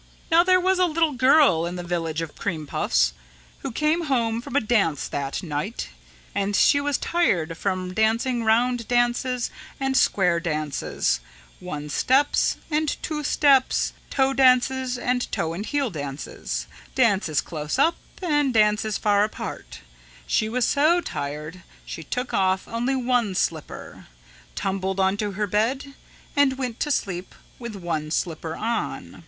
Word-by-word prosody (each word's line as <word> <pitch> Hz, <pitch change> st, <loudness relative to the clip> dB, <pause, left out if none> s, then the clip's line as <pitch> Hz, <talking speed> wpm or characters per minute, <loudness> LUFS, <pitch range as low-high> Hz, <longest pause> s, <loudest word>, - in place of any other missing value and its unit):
"Now 330 Hz, +1 st, +7 dB
there 370 Hz, 0 st, +4 dB
was 370 Hz, +1 st, +2 dB
a 365 Hz, -, +5 dB
little 325 Hz, -1 st, +1 dB
girl 260 Hz, -, +4 dB
in 175 Hz, -, -5 dB
the 175 Hz, -, -5 dB
Village 165 Hz, -2 st, -2 dB
of 160 Hz, -, -8 dB
Cream 160 Hz, -6 st, -3 dB
Puffs -, -, +1 dB, 0.5 s
who 270 Hz, -, -5 dB
came 305 Hz, +7 st, +1 dB
home 235 Hz, -5 st, 0 dB
from 245 Hz, -, -8 dB
a -, -, +6 dB
dance 210 Hz, -, +1 dB
that 140 Hz, +3 st, -3 dB
night. 160 Hz, -, -4 dB, 0.4 s
And 200 Hz, 0 st, 0 dB
she 285 Hz, -, +5 dB
was 290 Hz, 0 st, 0 dB
tired 175 Hz, -, 0 dB
from 185 Hz, 0 st, -2 dB
dancing 230 Hz, +3 st, +1 dB
round 235 Hz, +1 st, +2 dB
dances 240 Hz, +1 st, +1 dB, 0.3 s
and 270 Hz, 0 st, 0 dB
square 180 Hz, -9 st, +3 dB
dances, 155 Hz, -, -1 dB, 0.4 s
one 150 Hz, -5 st, -6 dB
steps 265 Hz, -, +2 dB
and 305 Hz, 0 st, 0 dB
two 300 Hz, -1 st, -3 dB
steps, 280 Hz, -3 st, +3 dB, 0.2 s
toe 270 Hz, 0 st, +2 dB
dances 260 Hz, -1 st, +3 dB
and 245 Hz, 0 st, -1 dB
toe 165 Hz, -1 st, -1 dB
and 185 Hz, +5 st, -4 dB
heel 280 Hz, -5 st, 0 dB
dances, 135 Hz, -, -5 dB, 0.3 s
dances 200 Hz, -, +2 dB
close 150 Hz, -, -4 dB
up 325 Hz, +5 st, +3 dB, 0.3 s
and 295 Hz, -6 st, +1 dB
dances 210 Hz, 0 st, +3 dB
far 205 Hz, -1 st, +3 dB
apart, 210 Hz, -, -6 dB, 0.4 s
she 215 Hz, -, +1 dB
was 245 Hz, +1 st, +1 dB
so 310 Hz, +5 st, +3 dB
tired 150 Hz, -, -5 dB, 0.2 s
she -, -, -7 dB
took 250 Hz, -, -4 dB
off 190 Hz, 0 st, +1 dB
only 240 Hz, +4 st, -1 dB
one 245 Hz, -6 st, +1 dB
slipper, 160 Hz, -4 st, -3 dB, 0.5 s
tumbled 190 Hz, 0 st, -2 dB
onto 200 Hz, +2 st, +1 dB
her 210 Hz, +2 st, -1 dB
bed 235 Hz, +8 st, -1 dB, 0.4 s
and 280 Hz, -2 st, +3 dB
went 250 Hz, -4 st, -4 dB
to 295 Hz, -, -1 dB
sleep 185 Hz, -9 st, -2 dB, 0.2 s
with 235 Hz, -3 st, -6 dB
one 165 Hz, -5 st, -3 dB
slipper 160 Hz, 0 st, -2 dB
on. 230 Hz, +2 st, -3 dB
220 Hz, 150 wpm, -24 LUFS, 175-265 Hz, 0.5 s, Now